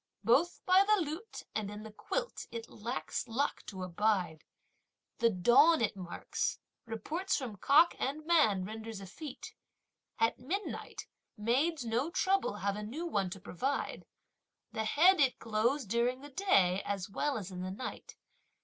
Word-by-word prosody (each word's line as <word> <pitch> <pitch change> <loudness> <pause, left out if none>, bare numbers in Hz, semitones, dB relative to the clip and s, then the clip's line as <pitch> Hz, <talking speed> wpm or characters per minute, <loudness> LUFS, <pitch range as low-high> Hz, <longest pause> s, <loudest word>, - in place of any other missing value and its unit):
Both 275 - +2
by 370 +1 +6
the 425 0 +3
lute 335 +7 -5
and 210 -2 -2
in 210 +1 -7
the 220 - -9
quilt, - - -4
it 230 -1 -6
lacks 235 +3 -4
luck 260 +6 -1
to 190 -2 -6
abide! 185 -3 0 0.8
The 230 - +5
dawn 250 - +5
it 220 -3 0
marks; 180 -3 -3 0.3
reports 315 - -2
from 240 -8 -5
cock 300 - +5
and 300 +3 -2
man 280 - +3
renders 220 +1 -6
effete! 250 - -8 0.6
At 225 - +1
midnight, 365 - -4 0.3
maids 260 +7 +1
no 235 +7 0
trouble 380 - +1
have 200 -1 -1
a 210 - -5
new 260 +11 -5
one 200 - 0
to 195 - -7
provide! 265 +12 -3 0.6
The 220 - -2
head, 345 - +5
it 265 -3 +3
glows 230 +5 0
during 235 +5 0
the 290 +1 -11
day, 200 - +3
as 195 -2 -3
well 280 +7 -1
as 200 -3 -6
in 180 -1 -6
the 185 - -3
night! 205 +7 -7
235 Hz, 155 wpm, -32 LUFS, 205-300 Hz, 0.8 s, by